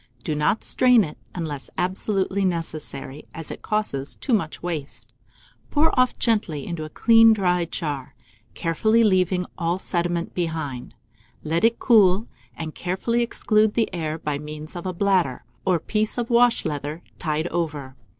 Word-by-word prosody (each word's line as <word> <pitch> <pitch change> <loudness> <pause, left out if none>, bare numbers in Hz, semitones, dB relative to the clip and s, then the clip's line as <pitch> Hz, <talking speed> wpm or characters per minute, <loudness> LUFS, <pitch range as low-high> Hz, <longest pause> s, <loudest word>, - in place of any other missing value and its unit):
Do 155 - -1
not 150 +8 +1
strain 250 -3 +5
it 150 - -7 0.2
unless 155 -6 -4
absolutely 190 +1 0
necessary, 155 -5 -3
as 165 -1 -5
it - - -8
causes 180 -11 -2
so 260 - -1
much 165 -8 -1
waste. 160 -5 -5 0.6
Pour 305 +2 +3
it 255 -1 +3
gently 205 - +1
off - - -8
into 165 -3 -4
a - - -8
clean 225 +5 +6
dry 180 -4 +1
jar, 145 -6 -4 0.4
carefully 215 +7 +2
leaving 185 -3 +2
all 170 +1 0
sediment 175 -2 -2
behind. 160 -7 -4 0.5
Let 165 +4 -1
it 230 +1 +4
cool, 210 -3 +4 0.3
and 160 -1 -5
carefully 190 +7 -1
exclude 215 -2 +2
the 225 -4 +1
air 160 -3 -2
by 150 -3 -3
means 150 +2 -8
of 175 +1 -5
a 185 - -2
bladder, 180 -8 +1 0.2
or 185 -2 +3
piece 215 +8 -1
of 240 0 -2
wash 235 0 +4
leather, 150 +3 -4 0.2
tied 155 -1 -1
over. 145 -6 -3
175 Hz, 155 wpm, -23 LUFS, 155-215 Hz, 0.6 s, clean